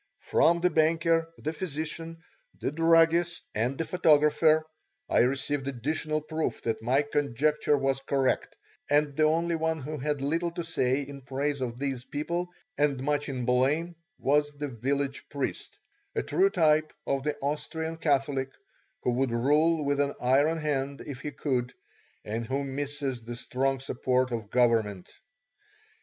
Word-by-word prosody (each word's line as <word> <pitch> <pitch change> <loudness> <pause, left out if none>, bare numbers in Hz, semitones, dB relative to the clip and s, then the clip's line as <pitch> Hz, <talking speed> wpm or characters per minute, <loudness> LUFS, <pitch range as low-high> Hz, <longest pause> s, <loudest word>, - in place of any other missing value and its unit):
From 170 +1 +3
the 180 0 +3
banker, 165 +1 +2
the 155 - -3
physician, 165 0 -4 0.4
the - - -1
druggist, 165 +2 +3
and 120 +5 -1
the 165 - -1
photographer, 155 -1 +4 0.4
I - - +2
received 135 +2 +1
additional 155 +4 -2
proof 155 +1 -3
that 110 -1 -1
my 130 +5 +2
conjecture 145 +1 +1
was 135 -1 0
correct, 135 -1 0 0.3
and 145 -1 +2
the 155 - +3
only 165 +2 +2
one 160 0 0
who 150 +2 -5
had 145 +1 -1
little 165 +5 0
to 170 - -3
say 140 -4 0
in 140 0 -9
praise 140 +2 -2
of 120 -2 -3
these 135 -2 -3
people 170 +6 -3 0.3
and 140 -3 +1
much 145 +1 0
in 125 -3 -3
blame 140 +8 +1 0.2
was 145 +1 +1
the 145 0 -3
village 135 +3 -2
priest, 140 -2 -4 0.4
a - - 0
true 390 +1 +3
type 155 - +2
of 135 0 0
the 150 +1 -2
Austrian 160 +3 -3
Catholic, 135 -3 0 0.5
who 125 - +2
would 130 +2 +1
rule 150 +6 +2
with 140 0 +1
an 140 0 +1
iron 140 +6 +3
hand 140 -2 -2
if 140 -4 -7
he 150 - -4
could, 130 -4 -2 0.5
and 115 +2 -3
who 135 +2 -1
misses 140 -2 -3
the 120 +1 -7
strong 135 +3 -1
support 130 -1 0
of 110 -4 -4
government. 110 -6 +1
145 Hz, 150 wpm, -28 LUFS, 130-155 Hz, 0.5 s, photographer